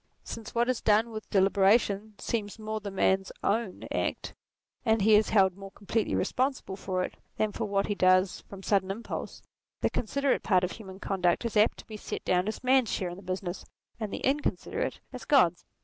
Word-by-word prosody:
Since 225 0 -8
what 235 +1 +2
is 255 -1 0
done 220 +2 +3
with 215 -1 -7
deliberation 200 +2 +3
seems 210 -3 -3
more 215 0 -4
the 205 -1 -6
man's 190 0 +1
own 210 -2 -1
act, - - -2 0.5
and 220 0 +3
he 215 +1 +5
is 210 +1 +5
held 190 -4 +4
more 195 0 -9
completely 205 +3 -2
responsible 260 -6 -1
for 185 -1 -2
it - - -6 0.2
than 215 -1 +1
for 225 - -3
what 200 -1 0
he 205 - -1
does 185 -1 +3
from 195 -1 -10
sudden 195 -2 +1
impulse, 220 +4 -5 0.4
the - - +1
considerate 280 +4 0
part 185 -3 +3
of 180 - -1
human 190 -3 -10
conduct 180 +1 0
is 230 - -3
apt 210 +1 +4
to - - -11
be 215 - -8
set - - -6
down 180 +1 +2
as 215 - -4
man's 255 -3 +4
share 185 - -1
in - - -7
the 195 - -11
business, 185 -1 -4 0.4
and 215 -3 -3
the - - -5
incon 285 +2 +1
siderate - - -3 0.2
as - - -7
God's. - - +3
205 Hz, 200 wpm, -29 LUFS, 190-220 Hz, 0.5 s, he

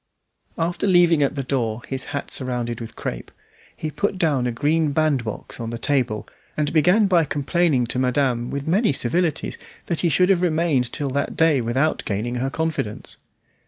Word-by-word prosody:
After 170 +4 -1
leaving 175 -4 +5
at 140 +1 +1
the 135 - -2
door 120 -3 -2
his 135 0 -3
hat 140 - -5
surrounded 120 -3 -2
with 115 - -8
crape, - - -5 0.5
he 155 - -4
put 200 +4 -1
down 145 -8 +1
a - - 0
green 150 +4 +1
bandbox 140 -8 -1
on 115 -1 -4
the 120 - -4
table, 120 -4 0 0.3
and 150 0 0
began 180 +7 +4
by 180 -4 +4
complaining 145 -2 +1
to 125 +2 -3
madame, 125 -2 +1
with 140 +1 -4
many 190 - +3
civilities, 160 +5 -1 0.3
that 170 - -2
he 170 - +2
should 180 +4 +3
have 185 -3 +3
remained 160 -7 +1
till 145 -2 -2
that 140 +2 -2
day 160 -5 +4
without 130 +7 0
gaining 110 +3 -2
her 135 - 0
confidence. 160 -8 -3
140 Hz, 175 wpm, -22 LUFS, 125-165 Hz, 0.5 s, leaving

